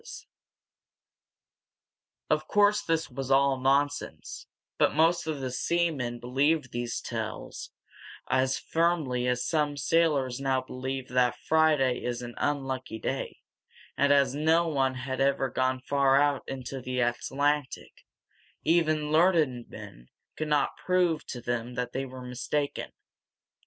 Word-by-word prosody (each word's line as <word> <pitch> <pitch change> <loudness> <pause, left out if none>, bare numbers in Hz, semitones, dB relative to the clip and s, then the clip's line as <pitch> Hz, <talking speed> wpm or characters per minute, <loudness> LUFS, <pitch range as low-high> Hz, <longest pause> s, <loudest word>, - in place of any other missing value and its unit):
[Illustration: 465 - -11 2.0
Primitive - - -49
Map] - - +3
Of - - -23
course 205 0 +4
this 165 -1 -1
was 135 +1 -5
all 135 0 +3
nonsense, 140 +2 -1 0.3
but - - +3
most 165 +2 +3
of 150 -3 -3
the 130 -1 -3
seamen 145 -5 -1
believed 135 +3 +1
these 120 -1 -3
tales - - -5 0.6
as 130 0 +1
firmly 160 -7 0
as 125 0 0
some 150 -3 0
sailors 140 -4 +1
now 135 -1 +1
believe 130 0 -5
that 125 -1 +2
Friday 155 -5 +3
is 125 0 -3
an 120 0 -7
unlucky 135 -5 -2
day; - - -4 0.5
and 140 0 +3
as 140 -2 +4
no 160 +3 +2
one 135 -4 0
had 130 +1 -4
ever 135 -1 +1
gone 130 0 0
far 140 +1 +3
out 145 -1 +2
in 135 -1 -5
the 125 0 -4
Atlantic, 135 +4 -1 0.6
even 155 -2 +2
learned 155 -7 +2
men - - -11 0.3
could 155 - -3
not 150 -1 +1
prove 180 -4 +1
to 120 - -6
them 120 0 -3
that 125 0 -3
they 135 +1 -2
were 130 0 -9
mistaken. 140 +3 -3
135 Hz, 135 wpm, -28 LUFS, 125-155 Hz, 2.0 s, course